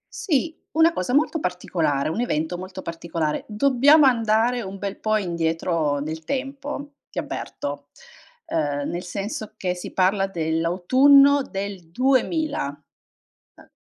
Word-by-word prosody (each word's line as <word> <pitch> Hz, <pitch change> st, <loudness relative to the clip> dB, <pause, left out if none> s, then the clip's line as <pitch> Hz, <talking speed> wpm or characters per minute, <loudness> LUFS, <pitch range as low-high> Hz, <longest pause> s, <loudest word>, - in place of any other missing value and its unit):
Sì, 330 Hz, -, 0 dB, 0.2 s
una 325 Hz, +1 st, +4 dB
cosa 215 Hz, +9 st, -1 dB
molto 310 Hz, +2 st, +2 dB
particolare, 165 Hz, -, -1 dB
un 210 Hz, +9 st, -2 dB
evento 160 Hz, -6 st, -1 dB
molto 185 Hz, 0 st, -8 dB
particolare. 165 Hz, -2 st, -3 dB
Dobbiamo 275 Hz, +6 st, +5 dB
andare 230 Hz, 0 st, +2 dB
un 195 Hz, -1 st, -7 dB
bel 200 Hz, 0 st, -5 dB
po' 215 Hz, 0 st, +1 dB
indietro 165 Hz, -4 st, -1 dB
nel 160 Hz, +2 st, -5 dB
tempo, 280 Hz, -, -5 dB
ti -, -, -15 dB
avverto, 145 Hz, 0 st, -5 dB, 0.6 s
ehm, 145 Hz, -2 st, -1 dB
nel 175 Hz, -, -3 dB
senso 205 Hz, +4 st, -5 dB
che 180 Hz, -1 st, -1 dB
si 180 Hz, -, -8 dB
parla 195 Hz, +1 st, +2 dB
dell'autunno 195 Hz, -, +4 dB
del 195 Hz, -6 st, -6 dB
2000. 260 Hz, -, 0 dB, 0.7 s
Ehm -, -, -19 dB
195 Hz, 125 wpm, -23 LUFS, 165-270 Hz, 0.7 s, Dobbiamo